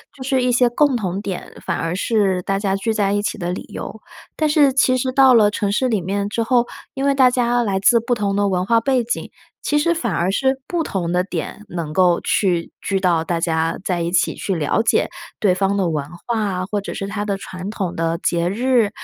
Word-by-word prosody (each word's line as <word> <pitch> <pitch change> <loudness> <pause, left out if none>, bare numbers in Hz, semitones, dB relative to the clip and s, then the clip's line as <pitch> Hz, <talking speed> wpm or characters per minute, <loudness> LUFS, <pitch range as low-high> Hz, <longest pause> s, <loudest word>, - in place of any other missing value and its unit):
就 265 - -8
是 260 -1 +1
一 250 - +2
些 245 0 +4
共 280 +2 +2
同 195 -4 -2
点， 195 -3 -5
反 - - -1
而 165 +2 -2
是 195 -2 +1
大 195 +2 -1
家 195 -1 0
聚 210 +3 -1
在 205 -2 +1
一 205 - +1
起 205 - -3
的 175 0 -3
理 180 - -5
由。 - - -7 0.4
但 310 - +2
是 295 -2 +4
其 255 -1 +3
实 255 +1 -1
到 265 0 +6
了 215 -3 +5
城 205 -1 -1
市 255 +5 +1
里 220 -4 +1
面 200 +3 -2
之 230 - -2
后， 240 +1 +2 0.3
因 270 0 -2
为 280 - +3
大 260 -2 +6
家 245 -1 +1
来 195 -3 0
自 235 +4 +5
不 235 +2 -1
同 200 -3 -1
的 205 0 +2
文 185 -2 0
化 230 +3 +3
背 255 +1 +1
景。 235 - -3 0.4
其 295 - +2
实 340 +3 +2
反 240 - -2
而 170 +3 0
是 265 +6 +1
不 345 -2 -1
同 180 - -2
的 180 0 +2
点 205 +2 -5
能 165 -3 -4
够 180 -1 +3
去 175 -4 0
聚 195 -1 -1
到 175 -4 +2
大 170 +1 -2
家 165 -1 0
在 180 -2 -1
一 170 0 -2
起 175 -2 +1
去 195 - -2
了 160 +6 +1
解 225 - +2 0.3
对 190 -4 +3
方 195 +1 0
的 190 -3 +1
文 150 -3 -1 0.2
化 235 -1 0
啊， 185 -3 -2
或 205 -1 -1
者 - - -6
是 195 - -4
它 205 +1 -3
的 200 -2 -2
传 185 0 -7
统 195 -5 -3
的 165 0 -1
节 170 0 0
日， 235 +1 +2
205 Hz, 260 characters per minute, -20 LUFS, 180-245 Hz, 0.4 s, 到